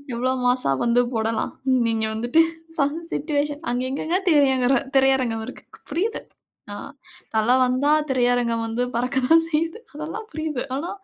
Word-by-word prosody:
எவ்ளோ 255 +2 0
மாஸ்ஸா 245 - +2
வந்து 240 +1 +3
போடலாம். 225 0 -1 0.4
நீங்க 220 -1 0
வந்துட்டு 240 +8 +3 0.4
சம் 285 +1 +1 0.2
சிட்யூவேஷன் 290 0 -1
அங்க 250 +1 -1
எங்கங்க 315 +6 -1
திரையரங்- 265 -4 +4 0.2
திரையரங்கம் 260 -4 +2
இருக்கு? - - -10 0.3
புரியுது. 420 +7 -1 0.5
அ - - -5 0.6
தல 220 +2 +2 0.2
வந்தா 260 +4 +1 0.2
திரையரங்கம் 245 -2 +1
வந்து 235 +2 -1
பறக்கத்தான் 265 +6 +3
செய்யுது. 330 +6 -1
அதெல்லாம் 320 +9 -6
புரியுது. 310 -4 -3
ஆனா, 330 +6 -3
260 Hz, 130 wpm, -23 LUFS, 240-300 Hz, 0.6 s, திரையரங்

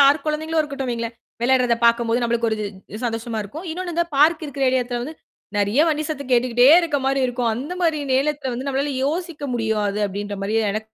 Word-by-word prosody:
யார் 280 +2 +5
குழந்தைகளும் 315 +1 -1
இருக்கட்டும் 275 -3 -3
வையுங்களேன். 230 -1 -3 0.3
விளையாடுறத 250 -2 +3
பாக்கும்போது, 235 0 +3
நம்மளுக்கு 235 -1 +1
ஒரு 220 - 0 0.3
இது 210 - -6
சந்தோஷமா 225 0 -3
இருக்கும். 310 - -8
இன்னொன்னு 355 +1 -4
இந்த 340 - +2
பார்க் 315 +3 +4
இருக்கற 280 -1 -5
ஏரியா 255 0 +2
எடத்துல 245 0 -4
வந்து 310 +5 -6 0.4
நெறையா 205 +8 +3
வண்டி 310 0 0
சத்தம் 280 -4 -5
கேட்டுக்கிட்டே 245 0 +4
இருக்க 315 -4 -1
மாரி 270 0 +1
இருக்கும். 245 -1 -1
அந்த 270 +9 -5
மாதிரி 325 -3 +2
நேரத்தில 275 -1 0
வந்து 255 +3 -5
நம்மளால 275 +1 -1
யோசிக்க 320 0 -3
முடியாது 215 -3 -1
அப்படின்ற 205 +1 -5
மாரி 215 +2 -1 0.2
எனக் 215 +1 -3
260 Hz, 190 wpm, -22 LUFS, 230-300 Hz, 0.4 s, யார்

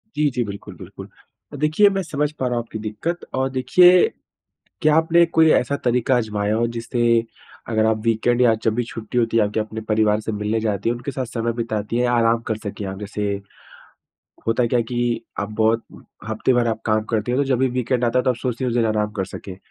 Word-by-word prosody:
जी, 150 -1 +2
जी, 125 -2 -1
बिल्कुल, 100 -1 -8
बिल्कुल। - - -10 0.5
देखिए, 155 +8 +4
मैं 195 -1 -1
समझ 150 -2 -1
पा 140 -4 -4
रहा 125 - -1
हूँ 120 - -1
आपकी 110 -1 -8
दिक्कत। 110 +12 -4
और 130 0 0
देखिए, 175 +8 +5 0.8
क्या 155 0 +4
आपने 165 +1 +4
कोई 160 -1 +4
ऐसा 140 +3 +1
तरीका 125 +1 +2
आज़माया 105 -2 -1
हो 120 +1 +1
जिससे 115 +1 -2 0.7
अगर 110 -1 +1
आप 110 -1 +2
वीकेंड 115 +2 +1
या 115 -2 +5
जब 110 - +2
भी 120 - 0
छुट्टी 115 +1 -5
होती 115 -1 +1
है, 110 - +5
आप 105 - -3
क्या 110 - 0
अपने 110 +1 -7
परिवार 105 -1 +2
से 110 - -4
मिलने 105 +2 -1
जाती 105 -1 -1
हैं, 120 - +1
उनके 120 +4 -5
साथ 130 -1 -3
समय 115 0 -2
बिताती 115 -1 -3
हैं 125 - +2
या 120 - +1
आराम 115 -1 +3
कर 110 - 0
सकें 105 -1 -6
आप? 95 0 -6
जैसे, 105 0 -3 1.2
होता 115 +1 +2
क्या 120 +1 +1
है - - +2
कि 120 -1 -1 0.2
आप 100 +1 -2
बहुत 115 +1 +2 0.4
हफ़्ते 110 +4 +1
भर 120 -1 +2
आप 110 -1 -2
काम 110 0 +2
करतीं 110 +2 -1
हैं, 130 - +1
तो - - 0
जब 130 - +2
भी 130 0 +2
वीकेंड 125 0 0
आता 120 +2 +2
है, - - +2
तो 130 - +3
आप 120 - -1
सोचती 125 0 -3
हैं 125 - +1
उस 120 - -1
दिन 115 -2 +2
आराम 105 -1 0
कर 95 - 0
सकें। 95 0 -9
115 Hz, 235 wpm, -21 LUFS, 110-130 Hz, 1.2 s, देखिए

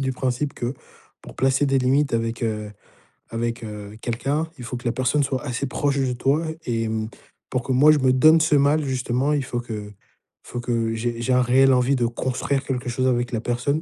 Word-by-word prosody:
du 130 -1 -1
principe 130 +3 -2
que, 120 +3 -4 0.5
pour - - -12
placer 135 +2 +2
des 135 -1 +2
limites 135 +2 +2
avec, 115 +1 -1
heu 105 -2 -2 0.6
avec, 115 +1 -3
heu 105 -1 -8
quelqu'un, 135 +7 -1
il 125 - -9
faut 125 - -5
que 120 +1 -8
la - - +2
personne 130 +4 +1
soit 130 0 -2
assez 125 +1 -2
proche 140 +1 0
de 130 -2 0
toi 140 +6 +1 0.2
et, 115 -2 -1
mmh, 110 0 -2 0.4
pour 130 - 0
que, 130 - -4
moi, 145 +4 +6
je 150 - +3
me 130 -1 +3
donne 155 +5 +6
ce 155 -1 +3
mal, 145 +2 +3
justement, 130 +1 0
il 140 -2 0
faut 120 -1 -3
que 105 -3 -6 0.5
faut 120 - -6
que 115 -2 -1
j'ai 120 +1 -3
j'ai 130 +2 +1
un 125 - +4
réel 130 +2 +5
envie 125 +2 +3
de 120 -2 +1
construire 130 +3 -2
quelque 125 -2 -3
chose 130 +2 -1
avec 120 -1 0
la 115 - -2
personne 125 +6 -1
125 Hz, 215 wpm, -23 LUFS, 120-135 Hz, 0.6 s, moi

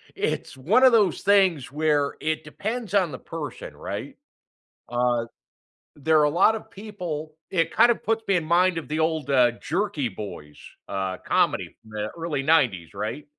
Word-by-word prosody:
it's - - -2
one 205 - +3
of 260 - +8
those 210 -6 +3
things 190 -9 +3
where 150 -1 +1
it 155 0 -1
depends 215 +6 -5
on 185 -5 +3
the 130 - -7
person, 150 -6 -7
right? - - -6 0.7
Uh, 120 -1 +1 0.7
there 155 +1 +3
a 150 - +4
lotta 200 +7 +3
people 175 -7 -7 0.2
it 165 -3 +1
kind 240 - +5
of 235 - -3
puts 225 0 0
me 195 - +3
in 175 - +1
mind 175 +2 +3
of 160 - -10
the 155 - -2
old, 160 -3 0
uh, 125 -3 +5
Jerky 160 - -1
Boys, 90 -8 -9 0.3
uh, 95 -1 -3
comedy - - 0
from 110 - -17
the 105 0 -3
early 165 -4 -2
'90s, 130 - +2
right? 110 +9 -4
155 Hz, 165 wpm, -25 LUFS, 130-185 Hz, 0.7 s, of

